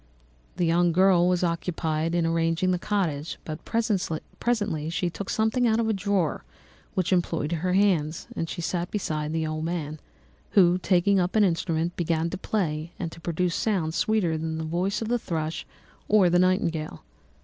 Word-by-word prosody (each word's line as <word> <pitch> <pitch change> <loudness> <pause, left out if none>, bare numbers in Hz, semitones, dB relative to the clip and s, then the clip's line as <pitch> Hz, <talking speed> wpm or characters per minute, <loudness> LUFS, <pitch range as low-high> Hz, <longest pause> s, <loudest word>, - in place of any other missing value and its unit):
The 175 - +2
young 170 +1 +3
girl 185 -1 +5
was 180 0 +1
occupied 165 -1 -1
in 170 -1 +2
arranging 165 +2 +1
the 180 - 0
cottage; 170 -7 -1
but 155 0 -6
presently 205 -3 -1
she 175 +1 -1
took 190 +4 -6
something 220 +3 +2
out 220 0 +2
of 230 - +1
a 220 - +2
drawer, 195 -4 0 0.5
which 185 0 +1
employed 165 -3 0
her 175 +2 0
hands, 175 -6 +2
and 165 - -3
she 175 - -4
sat 175 +1 -1
down - - -31
beside 155 -7 -2
the 160 0 -1
old 155 0 -3
man, 155 -2 -3 0.5
who, 180 -2 +5
taking 190 +2 +3
up 180 +2 0
an 215 - +5
instrument, 170 -2 0
began 165 -1 0
to 190 - -3
play 165 -6 -2
and 165 -3 -4
to 165 - -12
produce 170 +1 -1
sounds 175 -7 0
sweeter 185 -8 +1
than 160 0 -3
the 160 - -3
voice 180 +7 -1
of - - -4
the 240 +1 +1
thrush 160 -5 -3 0.4
or 200 -4 +5
the 175 - +4
nightingale. 170 - 0
175 Hz, 180 wpm, -26 LUFS, 160-190 Hz, 0.5 s, girl